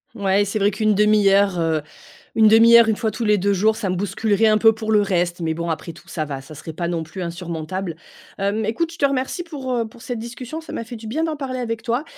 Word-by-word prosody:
Ouais, 200 Hz, -1 st, +2 dB
c'est 205 Hz, +2 st, -2 dB
vrai 200 Hz, 0 st, +3 dB
qu'1/2 210 Hz, 0 st, +3 dB
heure 195 Hz, -2 st, +3 dB
heu, 160 Hz, -2 st, +1 dB, 0.5 s
1/2 225 Hz, +1 st, +7 dB
heure, 235 Hz, -1 st, +6 dB
une 220 Hz, -, +2 dB
fois 220 Hz, 0 st, -1 dB
tous 220 Hz, +2 st, -4 dB
les 210 Hz, -1 st, +3 dB
2 200 Hz, +2 st, +1 dB
jours, 215 Hz, +3 st, +2 dB
ça 215 Hz, -4 st, -3 dB
me 180 Hz, -, 0 dB
bousculerait 205 Hz, +3 st, 0 dB
un 215 Hz, 0 st, +4 dB
peu 225 Hz, +1 st, +6 dB
pour 220 Hz, 0 st, -4 dB
le 210 Hz, -1 st, +5 dB
reste, 175 Hz, -3 st, 0 dB
mais 160 Hz, -1 st, -1 dB
bon, 170 Hz, +1 st, -3 dB
après 160 Hz, +1 st, -5 dB
tout, 165 Hz, -, -17 dB
ça 155 Hz, -, -3 dB
va, 140 Hz, -2 st, -5 dB
ça 135 Hz, +3 st, -12 dB
serait 155 Hz, +2 st, -8 dB
pas 170 Hz, +2 st, -3 dB
non 170 Hz, -1 st, -2 dB
plus 165 Hz, +4 st, -7 dB
insurmontable. 170 Hz, +1 st, -5 dB, 0.4 s
Hem, 200 Hz, +3 st, -1 dB
écoute 230 Hz, +11 st, -1 dB
je -, -, -13 dB
te -, -, +4 dB
remercie 275 Hz, +5 st, -2 dB
pour, 280 Hz, -6 st, -5 dB
heu, 230 Hz, -2 st, 0 dB
pour 230 Hz, +2 st, -16 dB
cette 245 Hz, -2 st, -4 dB
discussion, 245 Hz, +7 st, -7 dB
ça -, -, -11 dB
m'a -, -, -4 dB
fait 240 Hz, +2 st, -9 dB
du 220 Hz, 0 st, -10 dB
bien 295 Hz, +9 st, -1 dB
d'en 320 Hz, -1 st, -1 dB
parler 270 Hz, -3 st, -4 dB
avec 230 Hz, -2 st, -3 dB
toi 235 Hz, +4 st, -1 dB
210 Hz, 260 wpm, -21 LUFS, 180-230 Hz, 0.5 s, 1/2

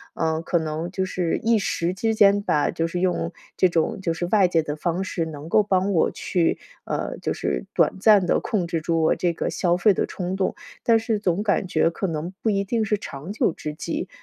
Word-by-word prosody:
呃， 160 Hz, 0 st, 0 dB
可 170 Hz, +1 st, 0 dB
能 160 Hz, +1 st, -3 dB
就 190 Hz, 0 st, -1 dB
是 180 Hz, -3 st, -1 dB
一 230 Hz, 0 st, +4 dB
时 175 Hz, -2 st, -1 dB
之 225 Hz, +3 st, 0 dB
间 205 Hz, -1 st, +5 dB
吧， 150 Hz, -7 st, +1 dB
就 165 Hz, 0 st, -1 dB
是 175 Hz, +1 st, -3 dB
用 175 Hz, -2 st, 0 dB, 0.2 s
这 185 Hz, -, +4 dB
种 175 Hz, +6 st, 0 dB
就 170 Hz, -3 st, 0 dB
是 175 Hz, -, -2 dB
外 200 Hz, -4 st, +5 dB
界 165 Hz, -2 st, +2 dB
的 150 Hz, -1 st, -4 dB
方 170 Hz, +4 st, -1 dB
式 175 Hz, -3 st, -2 dB
能 150 Hz, -1 st, -8 dB
够 215 Hz, -, +4 dB
帮 195 Hz, 0 st, +1 dB
我 165 Hz, -, +3 dB
去 170 Hz, -3 st, 0 dB, 0.3 s
呃， -, -, -3 dB
就 -, -, -2 dB
是 60 Hz, -, -2 dB
短 -, -, +2 dB
暂 205 Hz, -2 st, +5 dB
地 -, -, +2 dB
控 195 Hz, -6 st, -1 dB
制 165 Hz, -2 st, -2 dB
住 165 Hz, 0 st, 0 dB
我 -, -, +3 dB
这 175 Hz, -1 st, 0 dB
个 170 Hz, -, -3 dB
消 175 Hz, -2 st, +1 dB
费 200 Hz, +2 st, +4 dB
的 -, -, 0 dB
冲 180 Hz, 0 st, -4 dB
动， 190 Hz, -1 st, -1 dB, 0.3 s
但 230 Hz, -1 st, +5 dB
是 225 Hz, -1 st, -1 dB
总 195 Hz, 0 st, 0 dB
感 200 Hz, -2 st, +1 dB
觉 165 Hz, -, +2 dB
可 195 Hz, -, -3 dB
能 165 Hz, +2 st, -4 dB
不 225 Hz, -, +1 dB
一 200 Hz, -2 st, +1 dB
定 225 Hz, +3 st, 0 dB
是 210 Hz, 0 st, 0 dB
长 155 Hz, -1 st, -8 dB
久 205 Hz, -5 st, +1 dB
之 150 Hz, -, -6 dB
计。 -, -, -4 dB
180 Hz, 250 characters per minute, -23 LUFS, 165-200 Hz, 0.3 s, 间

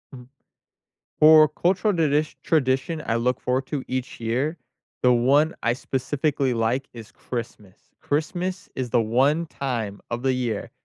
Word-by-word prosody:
Mm. 125 Hz, -1 st, -12 dB, 0.9 s
For 155 Hz, 0 st, +8 dB
cultural 185 Hz, +7 st, +1 dB
the 165 Hz, -3 st, +2 dB
dish 150 Hz, +2 st, 0 dB
tradition 150 Hz, +1 st, 0 dB
I 115 Hz, -, 0 dB
look 125 Hz, +2 st, 0 dB
forward 130 Hz, +1 st, -1 dB
to 145 Hz, -4 st, -3 dB
each 130 Hz, 0 st, -4 dB
year, 130 Hz, +8 st, -1 dB, 0.5 s
the 125 Hz, -1 st, +5 dB
one 140 Hz, +6 st, +3 dB
I 120 Hz, -, +2 dB
specifically 135 Hz, +1 st, -1 dB
like 120 Hz, +4 st, 0 dB
is 115 Hz, -3 st, -11 dB
Christmas. 110 Hz, -5 st, -7 dB, 0.2 s
Christmas 175 Hz, +5 st, -2 dB
is 130 Hz, -2 st, -3 dB
the 120 Hz, 0 st, +3 dB
one 135 Hz, +9 st, +2 dB
time 120 Hz, -9 st, -4 dB
of 120 Hz, +1 st, -4 dB
the 130 Hz, -1 st, +2 dB
year 120 Hz, -5 st, -3 dB
130 Hz, 150 wpm, -24 LUFS, 120-155 Hz, 0.9 s, For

